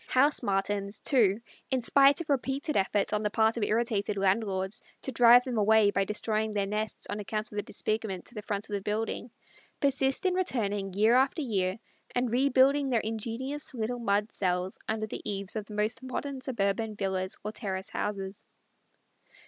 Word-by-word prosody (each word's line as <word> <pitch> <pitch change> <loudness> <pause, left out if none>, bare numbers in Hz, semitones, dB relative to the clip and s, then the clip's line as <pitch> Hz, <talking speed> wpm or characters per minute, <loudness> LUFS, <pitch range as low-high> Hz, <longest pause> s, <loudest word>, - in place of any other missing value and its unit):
House 280 +3 +3
Martins, 200 -1 -1
too, 220 -5 +3 0.3
in 260 - +1
spite 275 +5 +5
of 335 - -8
repeated 275 +3 -1
efforts 200 +1 +2
on 210 - +1
the 210 - 0
part 220 +1 +2
of 235 - -3
irritated 210 -1 0
landlords 195 +1 0 0.2
to 265 - -3
drive 240 0 +7
them 250 -4 -2
away 210 0 +5
by 195 -1 +1
destroying 215 +1 -1
their 200 -1 0
nests 210 +2 -3
on 205 - -4
account 215 +1 -4
of 205 - -3
the - - -2
disfigurement 215 -4 -2
to - - -12
the 210 - -6
front 205 0 -3
of 210 - -7
the 200 - -1
dwelling, 220 +4 -3 0.5
persist 270 +2 +1
in 370 - +3
returning 205 - -1
year 215 +3 +4
after 265 +5 +3
year 190 -6 0 0.4
and 245 -1 +1
rebuilding 275 +2 +4
their 240 -4 +1
ingenious 235 +6 -4
little 240 +1 -2
mud 210 -1 0
cells 180 0 -1
under 220 0 -1
the 215 - -6
eaves 200 0 -4
of 215 -2 -3
the 210 - -8
most 210 +4 0
modern 265 +1 -4
suburban 220 -3 -1
villas 190 -2 -2
or 210 - -2
terrace 195 -3 -4
houses. 195 -1 -4
215 Hz, 180 wpm, -29 LUFS, 200-250 Hz, 0.5 s, drive